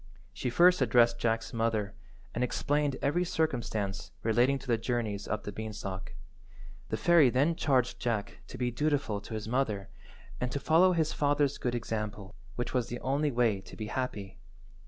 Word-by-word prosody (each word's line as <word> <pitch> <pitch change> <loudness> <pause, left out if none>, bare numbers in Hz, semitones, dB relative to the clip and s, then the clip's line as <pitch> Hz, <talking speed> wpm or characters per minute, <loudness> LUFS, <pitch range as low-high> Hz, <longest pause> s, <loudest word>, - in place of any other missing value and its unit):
She 125 +7 -2
first 175 +6 +5
addressed 120 -1 +4
Jack's 115 -1 -1
mother, 110 -3 0 0.4
and 120 - -1
explained 145 +2 0
every 165 +6 +2
circumstance 120 - -2
relating 120 +5 +3
to 135 - -12
the 120 -3 +1
journeys 110 -4 -2
up 105 0 -2
the 105 - -5
beanstalk. 105 -3 -6 0.7
The - - -1
fairy 170 -6 +5
then 140 +7 +2
charged 130 -6 +1
Jack 115 -4 -2
to - - -9
be 125 -1 -1
dutiful 140 -5 0
to 110 - -7
his 110 0 -5
mother, 110 -6 -1 0.5
and 125 0 -2
to 140 - -1
follow 175 +5 +4
his 160 -2 +1
father's 145 -1 +1
good 120 -1 -1
example, 105 -3 -4 0.2
which 120 - -3
was 125 -3 +1
the 120 - -5
only 140 +3 +1
way 120 -6 +1
to 95 - -12
be 110 - -5
happy. 100 -7 -4
120 Hz, 170 wpm, -30 LUFS, 110-140 Hz, 0.7 s, first